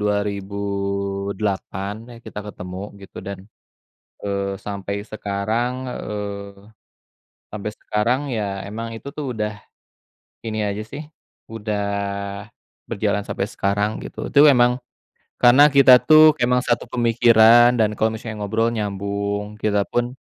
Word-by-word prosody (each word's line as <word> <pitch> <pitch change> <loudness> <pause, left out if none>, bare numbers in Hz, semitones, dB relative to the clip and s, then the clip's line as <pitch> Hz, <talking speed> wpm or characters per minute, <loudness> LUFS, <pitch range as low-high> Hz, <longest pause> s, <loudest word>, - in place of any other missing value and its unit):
2008, 100 0 -2
nah 120 - -11
kita 105 - -8
ketemu 95 -2 -7 0.2
gitu, 100 - -10
dan, 100 -1 -6 0.8
eee, 100 -1 -2
sampai 100 0 -4
sekarang 110 +3 -2 0.2
eee, 100 -3 -6 0.8
sampai 105 0 -4
sekarang 115 +6 0
ya 100 -3 -3
emang 115 +3 -5
itu 140 +5 -9
tuh 140 -6 -4
udah, 105 0 -1 0.9
ini 110 -1 -2
aja 100 +1 -3
sih, 140 +8 -8 0.4
udah 105 -2 -3 1.1
berjalan 105 -2 0
sampai 95 - -3
sekarang 105 +2 -1
gitu. - - -6
Itu 145 +1 +7
emang 125 -1 +3 0.6
karena 125 +4 +8
kita 135 -2 +8
tuh 155 0 +7
emang 125 +1 +2
satu 120 -2 0
pemikiran 120 0 +5
dan 110 -3 +2
kalau 110 0 +1
misalnya 110 -1 -7
ngobrol 115 +3 +1
nyambung, 100 -1 -3
kita 105 -1 +1
pun, 120 +1 -1
105 Hz, 120 wpm, -21 LUFS, 100-120 Hz, 1.1 s, karena